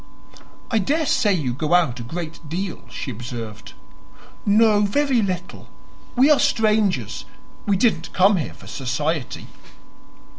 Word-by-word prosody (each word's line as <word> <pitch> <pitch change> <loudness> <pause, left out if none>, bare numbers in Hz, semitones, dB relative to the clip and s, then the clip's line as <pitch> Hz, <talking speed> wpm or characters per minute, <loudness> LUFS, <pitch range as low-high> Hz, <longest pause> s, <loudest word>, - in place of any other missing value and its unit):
"I 225 - +3
daresay 280 - +2
you 140 -9 -1
go 155 +6 +1
out 135 -9 +2
a - - -5
great 160 +4 -7
deal," 180 +2 -4
she 135 - -5
observed. 115 -2 -7 0.7
"No, 210 0 +5
very 255 +4 +2
little. 185 -4 -4 0.5
We 265 +4 +5
are 295 - +5
strangers, 210 - +1 0.3
and - - -9
we 200 - +4
didn't 230 +3 +1
come 195 +2 +4
here 160 - -4
for - - -15
society." 140 +2 -3
180 Hz, 135 wpm, -22 LUFS, 140-215 Hz, 0.7 s, No